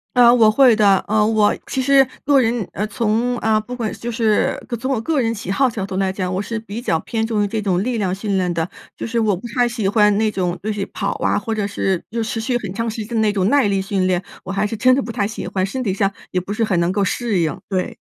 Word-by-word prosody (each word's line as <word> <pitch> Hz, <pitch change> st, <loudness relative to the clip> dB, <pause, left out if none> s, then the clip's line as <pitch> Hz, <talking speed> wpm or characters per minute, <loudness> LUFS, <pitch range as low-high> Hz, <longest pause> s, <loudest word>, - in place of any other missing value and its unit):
呃， 240 Hz, -1 st, +7 dB
我 225 Hz, -3 st, +5 dB
会 250 Hz, 0 st, +5 dB
的， 200 Hz, -3 st, +5 dB
呃， 210 Hz, 0 st, +3 dB
我 215 Hz, -1 st, +3 dB
其 265 Hz, -, -1 dB
实 270 Hz, 0 st, +5 dB, 0.2 s
个 280 Hz, -2 st, +5 dB
人 230 Hz, -3 st, 0 dB
呃， 205 Hz, -, -2 dB
从 230 Hz, +3 st, 0 dB
啊， 220 Hz, -1 st, +2 dB
不 245 Hz, +4 st, -9 dB
管 235 Hz, -4 st, -3 dB
就 240 Hz, +1 st, -5 dB
是 220 Hz, -2 st, +1 dB, 0.2 s
从 260 Hz, +4 st, -3 dB
我 230 Hz, -, 0 dB
个 290 Hz, +3 st, 0 dB
人 230 Hz, 0 st, 0 dB
喜 200 Hz, -4 st, -7 dB
好 260 Hz, +6 st, +2 dB
角 220 Hz, -4 st, -4 dB
度 195 Hz, -1 st, -6 dB
来 190 Hz, 0 st, +1 dB
讲， 185 Hz, -1 st, -3 dB
我 190 Hz, -, -1 dB
是 225 Hz, +2 st, -4 dB
比 225 Hz, +1 st, -7 dB
较 165 Hz, -9 st, 0 dB
偏 225 Hz, +4 st, -2 dB
重 220 Hz, -2 st, 0 dB
于 205 Hz, -, +1 dB
这 215 Hz, +1 st, -2 dB
种 190 Hz, -2 st, 0 dB
力 240 Hz, +2 st, -1 dB
量 190 Hz, -4 st, 0 dB
训 200 Hz, +1 st, -2 dB
练 180 Hz, -2 st, 0 dB
的， 165 Hz, +1 st, -2 dB, 0.3 s
就 -, -, -4 dB
是 230 Hz, +1 st, -3 dB
我 205 Hz, -4 st, +1 dB
不 235 Hz, -, -8 dB
太 245 Hz, -1 st, +4 dB
喜 230 Hz, -4 st, -2 dB
欢 210 Hz, 0 st, +4 dB
那 220 Hz, 0 st, +2 dB
种 180 Hz, -3 st, -2 dB
就 215 Hz, +1 st, -2 dB
是 200 Hz, -1 st, -3 dB
跑 200 Hz, 0 st, -3 dB
啊， -, -, +2 dB
或 220 Hz, +2 st, -3 dB
者 210 Hz, -2 st, -1 dB
是 195 Hz, -3 st, -1 dB
就 230 Hz, 0 st, -2 dB
持 225 Hz, 0 st, -3 dB
续 240 Hz, +2 st, 0 dB
很 205 Hz, -6 st, -6 dB
长 230 Hz, +3 st, -2 dB
时 220 Hz, -1 st, -5 dB
间 235 Hz, +1 st, -6 dB
的 220 Hz, -, +2 dB
那 210 Hz, -1 st, +3 dB
种 195 Hz, -2 st, 0 dB
耐 265 Hz, -3 st, +3 dB
力 195 Hz, -1 st, +1 dB
训 195 Hz, -1 st, -1 dB
练， 180 Hz, -1 st, +1 dB, 0.2 s
我 195 Hz, -, -6 dB
还 200 Hz, +2 st, 0 dB
是 225 Hz, -, -4 dB
真 255 Hz, +4 st, +4 dB
的 275 Hz, -, +2 dB
不 235 Hz, -, -6 dB
太 210 Hz, -4 st, 0 dB
喜 215 Hz, +1 st, -5 dB
欢， 190 Hz, -1 st, -1 dB
身 255 Hz, +6 st, -4 dB
体 195 Hz, -6 st, -1 dB
上 195 Hz, 0 st, +1 dB, 0.2 s
也 180 Hz, -, 0 dB
不 190 Hz, -, -7 dB
是 220 Hz, -, -3 dB
很 190 Hz, -4 st, 0 dB
能 170 Hz, -, +1 dB
够 200 Hz, +1 st, +1 dB
适 225 Hz, -2 st, -1 dB
应， 160 Hz, -2 st, 0 dB
对。 185 Hz, -2 st, -2 dB
215 Hz, 305 characters per minute, -20 LUFS, 195-235 Hz, 0.3 s, 呃